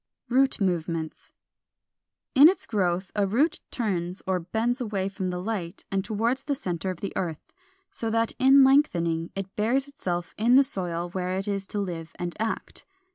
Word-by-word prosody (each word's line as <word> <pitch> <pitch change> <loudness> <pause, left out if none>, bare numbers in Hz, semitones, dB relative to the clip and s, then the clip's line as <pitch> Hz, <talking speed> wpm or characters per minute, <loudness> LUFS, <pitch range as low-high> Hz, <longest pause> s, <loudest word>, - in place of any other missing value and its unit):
464. 245 - -2 0.3
=Root 185 - +3
movements.= 165 -1 -5 1.0
In 290 +3 +9
its 375 - -2
growth 185 -3 0
a 205 -2 +2
root 265 - +2
turns 185 -6 -2
or 185 -1 +1
bends 225 +9 -1
away 205 -5 -1
from 195 -2 -3
the 180 0 -3
light 185 -4 -4
and 195 -1 0
toward 225 +4 0
the 285 +1 -2
centre 180 -6 -3
of 185 -2 -5
the 200 - -4
earth, 165 -4 -4 0.4
so 225 - -3
that 230 0 +2
in 270 +1 +7
lengthening 170 - +3
it 195 0 -5
buries 250 +6 +1
itself 180 - -4
in 235 +3 +5
the 275 - +8
soil 175 -7 -3
where 185 0 -2
it 195 - -3
is 200 -1 -2
to 205 - -3
live 170 -5 -4
and 175 -1 -4
act. 225 +1 -3
195 Hz, 180 wpm, -26 LUFS, 175-235 Hz, 1.0 s, In